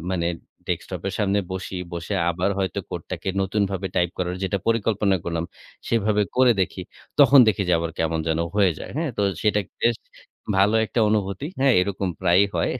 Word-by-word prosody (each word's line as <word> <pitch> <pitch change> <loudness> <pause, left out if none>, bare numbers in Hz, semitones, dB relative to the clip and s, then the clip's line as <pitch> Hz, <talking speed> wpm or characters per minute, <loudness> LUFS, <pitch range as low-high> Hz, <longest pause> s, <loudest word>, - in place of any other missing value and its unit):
মানে 85 -2 0 0.4
ডেস্কটপের 95 - -3
সামনে 100 -1 +1
বসি 95 0 -5 0.2
বসে 85 +4 -4 0.2
আবার 90 +3 0
হয়তো 95 -2 -1
কোডটাকে - - -5
নতুনভাবে 95 -1 -1
টাইপ 90 -1 +2
করার 90 0 -2
যেটার 95 0 -1
পরিকল্পনা 105 -3 +2
করলাম 85 -1 -2 0.4
সেভাবে 110 -2 +2
করে 130 -1 +6
দেখি। 95 0 -2 0.4
তখন 140 0 +8
দেখি 105 -2 +1
যে, - - +3
আবার 85 0 -2
কেমন 80 0 0
যেন 80 - +1 0.2
হয়ে 100 -4 +4
যায়, - - -8
হ্যাঁ। 160 -1 -1
তো - - +2 0.2
সেটা 105 -1 +2 0.2
বেশ 115 -1 +3 0.6
ভালো 100 +3 +4
একটা 115 - -1
অনুভূতি। 100 +3 -1
হ্যাঁ, 135 -2 +5
এরকম 95 0 -1
প্রায়ই 95 +2 +4
হয়। - - +1
100 Hz, 170 wpm, -23 LUFS, 90-105 Hz, 0.6 s, তখন